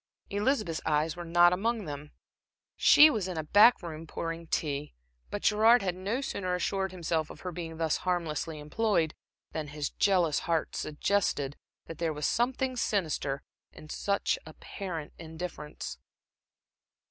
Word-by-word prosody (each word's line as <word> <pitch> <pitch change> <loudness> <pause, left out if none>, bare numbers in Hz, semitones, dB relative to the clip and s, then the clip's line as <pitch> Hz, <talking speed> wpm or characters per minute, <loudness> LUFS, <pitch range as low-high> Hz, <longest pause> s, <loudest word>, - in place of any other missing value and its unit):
Elizabeth's 205 - 0
eyes 155 +1 +1
were 175 - -6
not 175 +1 +5
among 220 +3 -1
them. 145 0 -6 0.7
She 305 +1 +8
was 210 -7 -1
in 180 -3 -4
a 160 - -1
back 205 +8 +6
room 160 -1 -7
pouring 165 +1 -5
tea. 145 - -2 0.3
But 205 - -5
Gerard 220 +2 +5
had 185 -2 0
no 200 +8 -2
sooner 185 -9 -2
assured 190 +1 -1
himself 165 -3 -1
of - - -11
her 180 - -4
being 165 -1 -6
thus 160 -2 +1
harmlessly 165 -3 -2
employed, 160 +1 0 0.4
than 155 -2 -4
his 145 0 -4
jealous 180 -7 +2
heart 165 -2 0
suggested 150 -3 0 0.3
that 165 - -9
there 165 -2 0
was 150 -1 -3
something 255 +2 0
sinister 155 - -1 0.3
in 155 - -13
such 200 +4 0
apparent 160 0 -7
indifference. 160 -1 -7
170 Hz, 145 wpm, -30 LUFS, 155-200 Hz, 0.7 s, She